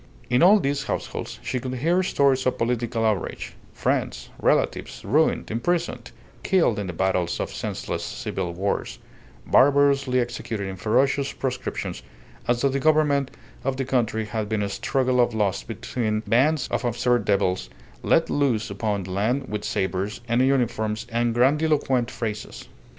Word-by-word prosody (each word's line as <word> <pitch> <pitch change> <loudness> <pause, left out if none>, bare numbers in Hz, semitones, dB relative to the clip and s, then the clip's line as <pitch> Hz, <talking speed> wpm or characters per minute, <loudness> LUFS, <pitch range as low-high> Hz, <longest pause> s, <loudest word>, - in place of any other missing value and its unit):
In 125 - +4
all 200 +5 +7
these 140 -4 -1
households - - -4
she 125 - -2
could 130 +1 -4
hear 170 +8 +2
stories 140 -7 +2
of 130 - 0
political 115 -1 0
outrage; 105 -5 -2 0.2
friends, - - -2
relatives, - - 0
ruined, - - +2
imprisoned, 140 - -1 0.3
killed 165 - +2
in 100 - -3
the - - -3
battles 95 0 0
of - - -3
senseless - - -4
civil 90 -3 -4
wars, 95 +4 -2 0.5
barbarously 140 -2 +4
executed 115 -4 -3
in 95 - -5
ferocious 130 +8 +1
proscriptions, 130 -1 -4 0.5
as 120 0 +1
though 140 - +3
the 135 +1 -1
government 150 -2 +3 0.3
of 135 -1 -1
the 135 - -1
country 115 -4 0
had 105 0 -3
been 110 -2 0
a 100 - -2
struggle 130 +4 +1
of 120 - +1
lust 100 -3 0
between 110 0 -2
bands 135 +6 +2
of - - -1
absurd 120 0 +1
devils 100 -2 0 0.3
let 165 - +3
loose 125 -8 0
upon 100 -1 -2
the 90 - -7
land 120 +8 0
with 105 0 -3
sabres 95 +3 -2
and 120 +2 +2
uniforms 115 -5 +1
and 115 0 0
grandiloquent 135 -2 +2
phrases. 110 -4 -5
120 Hz, 150 wpm, -24 LUFS, 105-135 Hz, 0.5 s, all